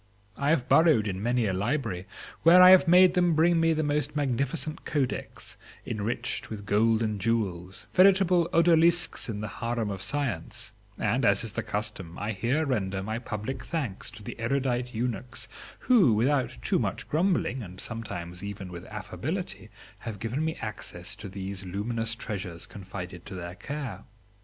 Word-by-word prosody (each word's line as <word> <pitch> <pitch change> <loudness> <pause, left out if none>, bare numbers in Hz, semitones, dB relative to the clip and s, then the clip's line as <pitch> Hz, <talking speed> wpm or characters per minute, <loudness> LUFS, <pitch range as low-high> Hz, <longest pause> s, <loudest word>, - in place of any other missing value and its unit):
I 140 - 0
have 145 -6 +2
burrowed 155 -11 +5
in 95 -1 -3
many 120 +1 +1
a 95 - 0
library, 100 -2 -2 0.3
where 170 +2 +8
I 185 +1 +11
made 180 +1 +7
them 175 -3 +3
bring 165 +2 +4
me 165 0 +4
the 155 0 +1
most 145 0 0
magnificent 140 +3 -1
codex 140 -4 -3 0.3
enriched 110 +1 -3
with 105 -2 -7
gold 110 +2 +3
and 105 -3 -2
jewels, 95 -5 -1
veritable 185 -2 +5
odalisques 170 -2 +3
in 105 -2 -3
the 105 - -3
harem 115 -3 -1
of 95 -1 -5
science; 120 -3 -3 0.3
and 125 +2 0
as 100 -1 +4
is 110 -2 -4
the - - -1
custom, 105 -5 -4
I 105 +2 -2
here 120 +10 0
render 100 -8 -1
my 110 +3 -3
public 120 +3 -5
thanks 135 - -4
to 105 - -11
the 105 - -7
erudite 125 0 -1
eunuchs 120 +1 -3 0.3
who, 205 - +5
without 130 - +1
too - - +2
much - - -3
grumbling 160 -6 +1
and 95 -3 -9
sometimes 90 -7 -6
even 100 -2 -6
with 85 -1 -8
affability, - - -5 0.3
have 110 -3 -6
given 115 +9 -2
me 160 0 -1
access 105 -3 -6
to 105 -2 -8
these 95 0 -5
luminous 115 +5 -2
treasures 95 -7 -5
confided 90 -2 -8
to - - -7
their 85 -1 -6
care. 125 -2 -6
115 Hz, 160 wpm, -28 LUFS, 100-145 Hz, 0.3 s, I